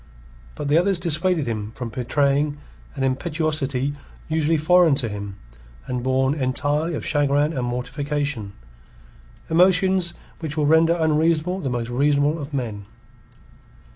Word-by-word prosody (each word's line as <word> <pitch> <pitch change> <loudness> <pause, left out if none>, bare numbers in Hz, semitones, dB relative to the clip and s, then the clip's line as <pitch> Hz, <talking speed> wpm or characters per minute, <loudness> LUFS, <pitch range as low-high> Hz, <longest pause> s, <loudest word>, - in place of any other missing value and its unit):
But 145 - -4
the 150 +3 +4
others 190 +1 +1
dissuaded 170 -1 +1
him 110 -2 -4
from 125 -2 -5
betraying 140 +5 0 0.4
an 135 - -3
impetuosity 145 -1 -1 0.3
usually 160 0 +1
foreign 170 0 +4
to 135 -4 0
him, 100 -2 -6 0.5
and 125 -1 -3
born 130 +2 +1
entirely 145 +4 -1
of - - -5
chagrin 145 +1 +1
and 125 -4 -2
mortification, 140 -3 -3 0.9
emotions 180 +1 +3 0.2
which 160 -2 -5
will 150 - +2
render 160 +2 +4
unreasonable 160 +3 +1
the 140 -7 -3
most 120 -1 -3
reasonable 145 +4 +2
of 145 0 -7
men. 110 -7 -4
145 Hz, 130 wpm, -22 LUFS, 130-160 Hz, 0.9 s, the